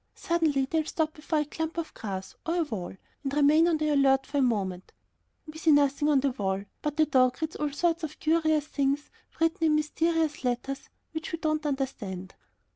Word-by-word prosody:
Suddenly 315 -5 +1
they'll 315 +3 0
stop 315 0 -1
before 310 0 -1
a - - -2
clump 320 +3 -4
of 335 -1 -3
grass, 190 -3 -6
or 330 - -1
a 345 - +2
wall, 200 - -5 0.3
and 275 -1 -2
remain 300 +3 +5
on 335 -2 +2
the 305 0 0
alert 270 -2 +4
for 285 +1 -1
a - - +4
moment. 195 -7 -1 0.5
We 310 0 -9
see 325 - +2
nothing 290 +1 +3
on 280 -3 +4
the 275 0 +1
wall, 195 -4 -2 0.2
but 300 0 -3
the 310 - +5
dog 255 -3 +3
reads 315 0 -3
all 300 -1 -1
sorts 335 +3 0
of 310 -1 -5
curious 315 -2 +2
things 285 -1 -1 0.3
written 330 +2 +1
in 305 - +4
mysterious 320 0 0
letters 250 +3 -2 0.2
which 315 0 -5
we 330 - -2
do 315 -1 -1
not 310 0 -1
understand. 210 -10 -4
300 Hz, 200 wpm, -28 LUFS, 270-315 Hz, 0.5 s, remain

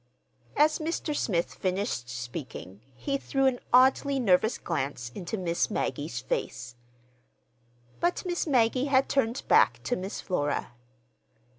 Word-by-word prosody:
As 305 +2 +4
Mr. 315 -1 -2
Smith 175 -11 0
finished 185 - -2
speaking, 120 - -7
he 275 - -2
threw 270 0 0
an 255 -2 +2
oddly 265 +2 +4
nervous 220 -1 +3
glance 135 -7 -3
into 190 +6 -4
Miss 170 -3 0
Maggie's - - -2
face. 470 - -3 1.3
But 350 +2 0
Miss 350 -1 -1
Maggie 255 -1 +3
had 270 -1 +3
turned 245 -2 0
back - - +5
to 245 - 0
Miss 190 +1 -5
Flora. 145 -9 -2
225 Hz, 125 wpm, -28 LUFS, 170-275 Hz, 1.3 s, back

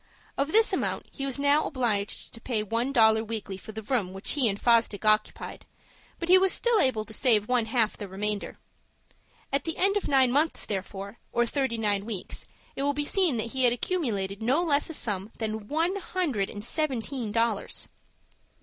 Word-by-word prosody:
Of 285 +2 -1
this 445 +1 +4
amount - - -1
he 275 - -4
was 270 - +1
now 285 +2 +3
obliged 225 -7 -1
to 230 - -10
pay 225 -4 -1
one 230 +5 -1
dollar 220 -3 +5
weekly 215 -3 -4
for 190 +3 -10
the 220 0 -7
room 205 -6 -1
which 195 +1 -1
he 265 -6 +3
and 200 0 -3
Fosdick 230 -3 +2
occupied, 215 0 +1 0.5
but 335 - -4
he 370 +1 +7
was 380 0 +3
still 475 -2 +2
able 240 - +1
to 220 - -10
save 215 -3 +2
one 245 -2 +2
half 225 -2 +1
the 205 - -6
remainder. 205 +2 -4 1.0
At 275 -1 +1
the 325 -1 -4
end 395 +2 +3
of 410 - -2
nine 265 -3 +4
months 300 +5 +1
therefore, 200 +1 -5
or 240 0 +2
thirty 265 -1 -1
nine 205 -3 0
weeks, 215 -5 -5 0.3
it - - -3
will 285 +1 +1
be 295 0 -1
seen 350 -7 +2
that 225 +1 -3
he 260 -1 0
had 240 - +5
accumulated 225 - -2
no 265 +9 +2
less 295 -3 +1
a 325 - -4
sum 205 -5 -1
than 220 -2 -4
one 330 - 0
hundred 335 - -2
and 205 +1 -7
seventeen 265 -5 -1
dollars. 230 -1 -1
235 Hz, 195 wpm, -27 LUFS, 215-285 Hz, 1.0 s, he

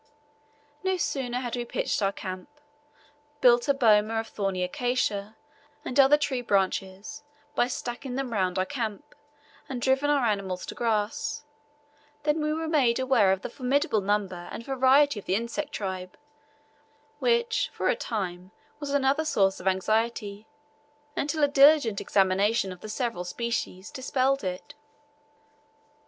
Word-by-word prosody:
No 375 0 +1
sooner 260 -6 -2
had 245 -2 -3
we 240 - -2
pitched 235 - -2
our 195 -1 +2
camp, 185 +4 -7 0.9
built 240 0 +5
a 280 - +4
boma 220 -4 +4
of 225 - -4
thorny 195 -3 -2
acacia, 215 0 -1 0.5
and 255 - -1
other 275 +2 +7
tree 285 -4 -1
branches, 195 -2 -1 0.3
by 240 - +2
stacking 250 +1 -5
them 265 -3 -3
round 185 -3 0
our 185 - +1
camp, 220 -2 -5 0.6
and 260 -2 -3
driven 265 +3 +2
our 285 -4 +3
animals 195 -4 -1
to - - -6
grass; 225 +5 -1 0.8
than 300 +1 +1
we 305 0 0
were 320 +1 -2
made 270 -7 +3
aware 255 -7 +3
of 190 +1 -1
the - - -4
formidable 255 -4 +1
number 190 -3 -2
and 230 - -7
variety 270 -1 +4
of - - -13
the 185 - +2
insect 235 +7 -3
tribe, 185 -2 -5 1.0
which 470 -1 +1
for - - -2
a - - +3
time 185 -5 -4 0.3
was 290 -1 -5
another 280 +2 +2
source 195 -10 +1
of - - -5
anxiety, 215 +2 0 0.7
until 295 +1 -1
a - - +6
diligent 280 -6 +5
examination 195 +1 +2
of 180 - -9
the 215 - -8
several 230 -5 -2
species 215 -1 -4
dispelled 265 0 0
it. 185 0 -5
235 Hz, 145 wpm, -27 LUFS, 195-275 Hz, 1.0 s, other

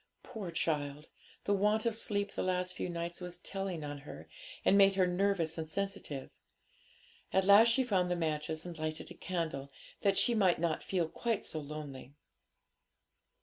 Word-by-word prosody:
Poor 220 -7 -6
child! 150 -3 -1 0.4
the 205 - +1
want 210 +3 +2
of 230 -2 +1
sleep 205 -2 -1
the - - -3
last 180 0 0
few - - -3
nights 170 +1 -4
was 180 0 -4
telling 190 -3 -4
on 145 -1 -5
her, 145 - -9 0.4
and - - +5
had - - +6
made 195 -1 +6
her 190 -1 +4
nervous 180 -3 +1
and 160 -1 -4
sensitive. 160 -7 -3 1.0
At 190 0 +3
last 205 +3 +8
she 235 +3 +3
found 190 -7 +1
the 180 - +1
matches 155 -1 -2
and 175 -1 -6
lighted 155 0 -3
a - - -6
candle, 160 -7 -3 0.3
that 195 -1 +3
she 240 - +4
might 190 -6 +4
not 165 -2 0
feel 175 -4 0
quite 230 +5 -2
so 155 - -3
lonely. 145 -2 -8
180 Hz, 175 wpm, -33 LUFS, 155-200 Hz, 1.0 s, last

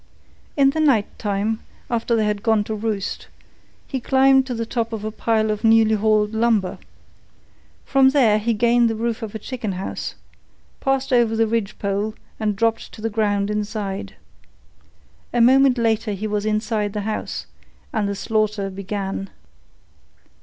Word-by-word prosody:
In 275 -1 +5
the 315 - -3
night 265 -10 +4
time, 210 +1 -1 0.3
after 235 0 0
they 220 -1 +2
had 210 -1 -1
gone 220 -2 +2
to 220 - -4
roost, 210 -2 -3 0.6
he 265 - -3
climbed 265 +1 +4
to 250 - -3
the 230 0 -2
top 230 -1 -2
of 215 -1 -4
a 215 - -2
pile 220 0 +1
of 210 0 -4
newly 225 -1 +5
hauled 215 0 +2
lumber. 220 -4 +1 1.1
From 270 -1 +5
there 240 -7 +4
he 225 +2 0
gained 235 +1 +3
the 225 - -2
roof 230 +1 -2
of 220 -1 -6
a - - -1
chicken 220 -2 -4
house, 185 +1 -5 0.6
passed 270 0 0
over 235 -2 +3
the 225 0 +3
ridgepole 210 -1 -2 0.2
and 210 -2 0
dropped 225 +2 0
to - - -11
the 225 - -1
ground 205 -1 0
inside. 210 -2 -4 1.2
A 240 - +1
moment 260 +2 +5
later 225 -2 +1
he 200 +2 -4
was 210 0 -1
inside 215 -1 -1
the 210 - -2
house, 215 +1 -4 0.5
and 210 -3 0
the 200 - -2
slaughter 210 -1 -1
began. 195 0 -4
220 Hz, 160 wpm, -22 LUFS, 210-235 Hz, 1.2 s, In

